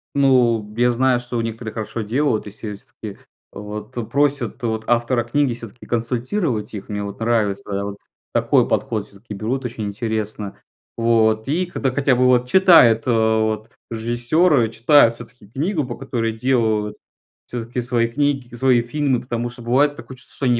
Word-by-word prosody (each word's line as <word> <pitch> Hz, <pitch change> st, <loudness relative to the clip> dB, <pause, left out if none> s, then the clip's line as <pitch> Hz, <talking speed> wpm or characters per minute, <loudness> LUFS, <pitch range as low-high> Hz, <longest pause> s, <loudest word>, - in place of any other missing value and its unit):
Ну, 120 Hz, -6 st, +3 dB
я 120 Hz, +1 st, +4 dB
знаю, 125 Hz, +1 st, +2 dB
что 120 Hz, 0 st, -5 dB
у -, -, +1 dB
некоторых 115 Hz, 0 st, -5 dB
хорошо 110 Hz, +1 st, -4 dB
делают, 115 Hz, +2 st, 0 dB
если 105 Hz, +1 st, -7 dB
с 100 Hz, -, -18 dB
к -, -, -50 dB
и, 105 Hz, -3 st, -6 dB, 0.3 s
вот, 105 Hz, +1 st, -8 dB
то 120 Hz, -, -3 dB
просят, 140 Hz, -2 st, 0 dB
вот, 110 Hz, -1 st, -1 dB
автора 120 Hz, +1 st, +1 dB
книги 130 Hz, +2 st, +1 dB
всё-таки 115 Hz, 0 st, -11 dB
консультировать 120 Hz, -, -2 dB
их. 100 Hz, -, -7 dB
Мне 105 Hz, -1 st, -3 dB
вот 100 Hz, 0 st, -7 dB
нравится, 110 Hz, -4 st, 0 dB, 0.2 s
вот, 100 Hz, 0 st, -5 dB, 0.4 s
такой -, -, +3 dB
подход. 110 Hz, -3 st, -1 dB
Всё-таки 105 Hz, +2 st, -11 dB
берут 120 Hz, +6 st, -3 dB
очень 115 Hz, -3 st, -4 dB
интересно, 105 Hz, -1 st, -4 dB, 0.4 s
вот. 110 Hz, -1 st, +2 dB
И 170 Hz, +6 st, 0 dB
когда 135 Hz, -6 st, -2 dB
хотя 140 Hz, 0 st, +2 dB
бы 125 Hz, +1 st, +3 dB
вот 125 Hz, -1 st, +3 dB
читают, 160 Hz, -, +6 dB
э, -, -, +3 dB
вот, 110 Hz, -1 st, +1 dB, 0.2 s
режиссёры 120 Hz, +4 st, +2 dB
читают 115 Hz, +1 st, +4 dB
всё-таки 120 Hz, -2 st, -14 dB
книгу, 150 Hz, -, -1 dB
по 120 Hz, -1 st, -6 dB
которой 120 Hz, -4 st, -2 dB
делают. 110 Hz, -3 st, 0 dB, 0.5 s
Всё-таки 120 Hz, +1 st, -4 dB
свои 120 Hz, -1 st, +1 dB
книг 135 Hz, -1 st, -1 dB
свои 125 Hz, -1 st, +3 dB
фильмы, 130 Hz, +1 st, 0 dB
потому 120 Hz, -1 st, -3 dB
что 120 Hz, 0 st, -11 dB
бывает 140 Hz, +5 st, +2 dB
такое 130 Hz, -, -10 dB
чувство, 130 Hz, -, -12 dB
что -, -, -3 dB
они 120 Hz, -1 st, +3 dB
120 Hz, 170 wpm, -21 LUFS, 110-130 Hz, 0.5 s, читают